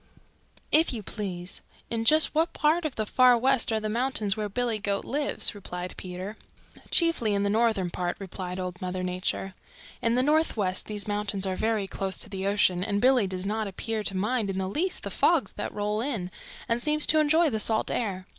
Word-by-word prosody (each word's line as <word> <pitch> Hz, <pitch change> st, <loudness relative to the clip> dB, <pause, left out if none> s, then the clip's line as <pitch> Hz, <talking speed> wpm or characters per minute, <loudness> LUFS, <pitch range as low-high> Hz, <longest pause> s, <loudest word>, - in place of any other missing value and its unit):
"If 320 Hz, +2 st, +5 dB
you 220 Hz, -3 st, -4 dB
please, 185 Hz, -3 st, -5 dB, 0.3 s
in 225 Hz, -1 st, -1 dB
just 310 Hz, +6 st, +4 dB
what 320 Hz, +2 st, +1 dB
part 315 Hz, +3 st, +2 dB
of 300 Hz, -, -2 dB
the 215 Hz, -, -1 dB
Far 250 Hz, +2 st, +5 dB
West 260 Hz, -1 st, +2 dB
are 220 Hz, -, +1 dB
the 215 Hz, -, -3 dB
mountains 225 Hz, -3 st, 0 dB
where 210 Hz, -1 st, -3 dB
Billy 235 Hz, 0 st, -1 dB
Goat 200 Hz, -1 st, -2 dB
lives?" 290 Hz, -3 st, +1 dB
replied 180 Hz, -3 st, -6 dB
Peter. 185 Hz, +3 st, -7 dB, 0.5 s
"Chiefly 330 Hz, -, +3 dB
in 200 Hz, -, +1 dB
the 200 Hz, -, +1 dB
northern 215 Hz, -5 st, +1 dB
part," 175 Hz, 0 st, -2 dB
replied 185 Hz, -1 st, -6 dB
Old 180 Hz, -1 st, -5 dB
Mother 185 Hz, 0 st, -3 dB
Nature. 185 Hz, +1 st, -2 dB, 0.5 s
"In 230 Hz, 0 st, +2 dB
the 255 Hz, -, +3 dB
Northwest 260 Hz, -, +1 dB
these 210 Hz, -1 st, -3 dB
mountains 205 Hz, -1 st, -1 dB
are 190 Hz, -1 st, -1 dB
very 220 Hz, 0 st, 0 dB
close 190 Hz, -1 st, -4 dB
to 225 Hz, -, -4 dB
the 195 Hz, -1 st, -3 dB
ocean 190 Hz, -3 st, +2 dB
and 200 Hz, 0 st, 0 dB
Billy 250 Hz, -3 st, +4 dB
does 185 Hz, 0 st, -4 dB
not 215 Hz, +1 st, -1 dB
appear 220 Hz, +3 st, -3 dB
to 195 Hz, -2 st, -2 dB
mind 210 Hz, +2 st, 0 dB
in 190 Hz, -, -2 dB
the 190 Hz, -1 st, -1 dB
least 345 Hz, -, -1 dB
the -, -, -5 dB
fogs -, -, +2 dB
that -, -, -4 dB
roll 210 Hz, +1 st, -1 dB
in, 225 Hz, -9 st, -3 dB, 0.4 s
and 235 Hz, +1 st, 0 dB
seems 300 Hz, +2 st, +1 dB
to 310 Hz, -, +4 dB
enjoy 310 Hz, +1 st, +4 dB
the 220 Hz, -, -1 dB
salt 220 Hz, +1 st, +1 dB
air. 190 Hz, -5 st, -2 dB
210 Hz, 200 wpm, -27 LUFS, 190-245 Hz, 0.5 s, If